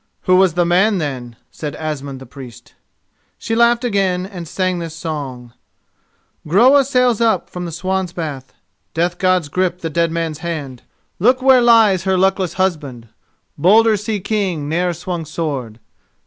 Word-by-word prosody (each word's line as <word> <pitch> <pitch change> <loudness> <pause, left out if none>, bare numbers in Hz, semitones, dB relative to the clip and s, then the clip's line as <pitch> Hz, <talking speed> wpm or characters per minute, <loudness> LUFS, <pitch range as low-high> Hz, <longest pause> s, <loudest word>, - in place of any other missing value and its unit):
"Who 185 - +3
was 185 -3 +3
the 175 -1 +2
man, 190 +5 +3
then?" 130 -7 -5 0.2
said 150 -2 -6
Asmund 140 -4 -5
the 135 - -11
Priest. 125 -2 -13 0.6
She 225 - -4
laughed 235 +1 +3
again 195 -5 0
and 180 -4 -8
sang 185 +1 -1
this 165 -1 -6
song:— 135 -7 -6 0.9
Groa 255 - +5
sails 250 -4 +1
up 225 -1 +1
from 180 0 -5
the 170 - -5
Swan's 185 +1 -2
Bath, 150 -7 -6 0.4
Death 175 +2 -1
Gods 185 -4 +2
grip 180 +3 -1
the 165 - -4
Dead 170 +1 +1
Man's 165 -2 -3
hand. 150 -7 -5 0.4
Look 250 +7 +3
where 260 -2 +6
lies 225 -6 +4
her 190 -1 +2
luckless 190 -1 +1
husband, 150 - -3 0.5
Bolder 215 +7 +5
sea 210 +1 -3
king 190 -7 -2
ne'er 175 +3 0
swung 175 0 -5
sword! 145 -8 -4
175 Hz, 155 wpm, -18 LUFS, 155-195 Hz, 0.9 s, where